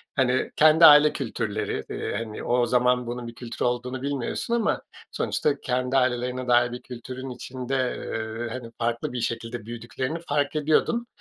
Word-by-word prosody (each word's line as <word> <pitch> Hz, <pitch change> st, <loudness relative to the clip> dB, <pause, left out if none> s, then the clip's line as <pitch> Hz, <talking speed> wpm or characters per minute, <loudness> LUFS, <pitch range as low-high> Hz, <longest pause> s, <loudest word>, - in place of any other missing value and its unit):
Hani, 130 Hz, -1 st, +1 dB
kendi 155 Hz, +2 st, +7 dB
aile 150 Hz, 0 st, +8 dB
kültürleri, 110 Hz, -5 st, -3 dB
eee, -, -, -3 dB
hani, 110 Hz, -1 st, -5 dB
o 120 Hz, 0 st, +2 dB
zaman 125 Hz, 0 st, +2 dB
bunun 120 Hz, 0 st, -5 dB
bir 115 Hz, -, -9 dB
kültür 120 Hz, -1 st, -4 dB
olduğunu 125 Hz, +1 st, -2 dB
bilmiyorsun 140 Hz, -, -2 dB
ama 230 Hz, -3 st, +1 dB, 0.3 s
sonuçta 145 Hz, -2 st, 0 dB
kendi 125 Hz, +1 st, 0 dB
ailelerine 125 Hz, 0 st, 0 dB
dair 120 Hz, 0 st, +4 dB
bir 125 Hz, -, -6 dB
kültürün 130 Hz, +1 st, -8 dB
içinde, 130 Hz, +1 st, -5 dB, 0.2 s
eee, 115 Hz, +1 st, -4 dB
hani, 120 Hz, -2 st, -7 dB
farklı 120 Hz, +1 st, -1 dB
bir 125 Hz, -, -2 dB
şekilde 115 Hz, 0 st, -4 dB
büyüdüklerini 120 Hz, +6 st, -4 dB
fark 145 Hz, 0 st, 0 dB
ediyordum. 155 Hz, +11 st, +1 dB
125 Hz, 155 wpm, -25 LUFS, 120-135 Hz, 0.3 s, aile